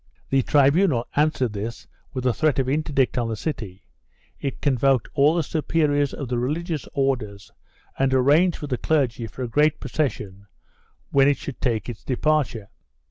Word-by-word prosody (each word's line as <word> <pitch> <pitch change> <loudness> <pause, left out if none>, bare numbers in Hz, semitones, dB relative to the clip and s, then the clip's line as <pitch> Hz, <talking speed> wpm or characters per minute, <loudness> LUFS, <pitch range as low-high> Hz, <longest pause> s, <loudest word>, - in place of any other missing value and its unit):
The 135 0 +4
tribunal 140 -1 +3
answered 145 -6 +1
this 110 +3 -5 0.3
with 130 -2 -5
a 125 - +3
threat 155 +1 +1
of 135 -2 0
interdict 140 -2 0
on 115 -1 -1
the 110 - -2
city; 105 - -6 0.5
it 140 - -4
convoked 135 -2 +2
all 145 +4 +4
the 170 - +1
superiors 150 -2 0
of 140 - -6
the 120 0 -1
religious 155 +4 -3
Orders 120 -8 -2 0.5
and 135 0 +2
arranged 145 +7 +3
with 145 -2 -6
the 125 - -1
clergy 125 -7 0
for 130 - -7
a - - -2
great 150 +5 +2
procession 100 -9 -3 0.6
when 135 0 +5
it 145 - +3
should 140 - -8
take 115 -5 -1
.its 120 -3 -7
departure. 130 -5 0
135 Hz, 165 wpm, -23 LUFS, 120-150 Hz, 0.6 s, when